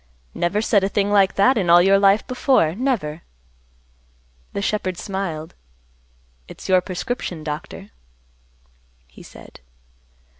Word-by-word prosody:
Never 205 +5 -1
said 205 -3 +2
a 195 - 0
thing 200 0 0
like 195 -2 +3
that 240 +5 +3
in 180 -3 -1
all 170 +1 +8
your 195 +2 +4
life 200 +1 +3
before, 255 - +1
never." 195 - -2 1.3
The 200 - -3
shepherd 190 -4 -2
smiled, 180 -6 -5 0.9
"It's - - -11
your 185 -1 +4
prescription, 180 -2 -5
Doctor," 150 -8 -7 1.2
he - - -16
said. - - -15
195 Hz, 120 wpm, -21 LUFS, 170-205 Hz, 1.3 s, all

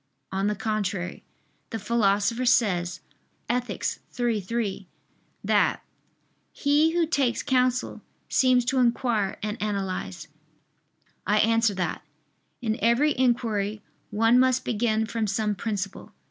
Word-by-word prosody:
On 195 +1 0
the 210 - 0
contrary, 200 -4 -2 0.5
The 225 - -3
Philosopher 215 +1 +1
says 185 -8 +2 0.5
(Ethic. 240 -5 -2 0.3
iii, 235 -3 +1
3) 200 -2 -3 0.6
that - - +2 0.7
"he 300 +3 +2
who 345 -1 +3
takes 275 -7 0
counsel 255 -1 +1 0.3
seems 255 -2 +3
to 260 +1 +1
inquire 235 -4 +1
and 215 +2 -3
analyze." 195 - -3 1.0
I 210 +2 +3
answer 225 -1 +3
that, 180 -1 -2 0.6
In 220 +1 -1
every 250 +6 +3
inquiry 220 -5 0 0.3
one 225 +4 +4
must 255 0 +2
begin 220 -1 +1
from 225 -1 -2
some 210 +1 0
principle. 200 -1 -4
225 Hz, 115 wpm, -26 LUFS, 205-245 Hz, 1.0 s, one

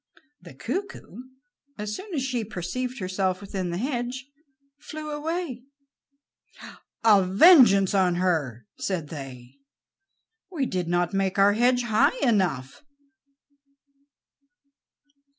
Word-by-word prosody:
The - - -14
cuckoo, 365 - -6 0.5
as 210 0 -4
soon 395 +2 -9
as 270 - -1
she 255 -3 -2
perceived 225 +6 -5
herself 185 -2 -2
within 195 -3 -5
the 170 - -3
hedge, 250 +2 -3 0.5
flew 305 0 -8
away. 300 -3 -4 1.4
"A 210 -4 +5
vengeance 200 - +6
on 185 -3 +2
her!" 155 - -1
said 170 -6 -3
they. 135 -3 -10 0.9
"We 315 -8 -2
did 180 -7 -3
not 175 +1 0
make 195 -1 -1
our 200 +1 +5
hedge 245 +3 +2
high 220 - +2
enough." 180 - 0
205 Hz, 105 wpm, -25 LUFS, 180-255 Hz, 1.4 s, vengeance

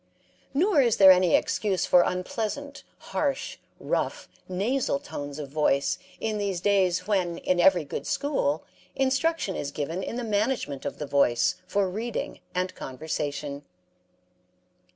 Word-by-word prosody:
Nor 325 +2 +3
is 235 -4 +2
there 190 -1 +9
any 180 -2 +5
excuse 190 -4 0
for 180 - +6
unpleasant, 225 +11 -3 0.2
harsh, 280 -2 -2 0.2
rough, - - -2 0.2
nasal 235 +10 0
tones 145 - -7
of 145 -3 -6
voice 140 -1 +1 0.2
in 215 -1 -2
these 200 -3 -1
days 185 -2 +2
when 180 -4 0
in 180 0 0
every 175 -2 +5
good 140 -1 -5
school 270 - 0 0.3
instruction 270 - +1
is 140 - -3
given 160 +6 -3
in 230 - -4
the 245 - -3
management 210 - -1
of - - -4
the 150 - -4
voice 140 -4 +2
for 200 +1 +1
reading 220 +5 -4 0.2
and 185 0 -1
conversation. 145 0 -4
185 Hz, 135 wpm, -27 LUFS, 155-230 Hz, 0.3 s, there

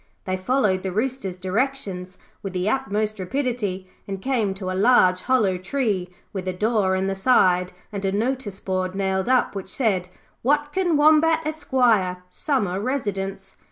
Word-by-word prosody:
They 185 - -1
followed 190 -1 +1
the 190 - -3
Rooster's 215 -3 -2
directions 190 -2 -2 0.2
with 195 -2 -5
the 180 +1 -1
utmost 215 -3 -1
rapidity, 205 -4 -2 0.2
and 195 -1 -4
came 220 -5 0
to 190 -1 -4
a - - -2
large 185 -3 +4
hollow 210 -8 +2
tree 195 -3 -1 0.2
with 190 -2 -4
a 185 - 0
door 210 -1 +1
in 190 0 0
the 195 - 0
side 185 -4 +3 0.2
and 200 -1 -5
a 195 - +1
notice 220 -1 -2
board 185 -1 -2
nailed 190 +2 0
up 255 -1 +3
which 195 -1 -6
said, 195 -7 0 0.3
'Watkin 295 +5 +1
Wombat, 315 +2 +5
Esq., 310 0 -5 0.6
Summer 205 - -1
Residence'. 195 -6 -3
200 Hz, 155 wpm, -23 LUFS, 185-255 Hz, 0.6 s, Wombat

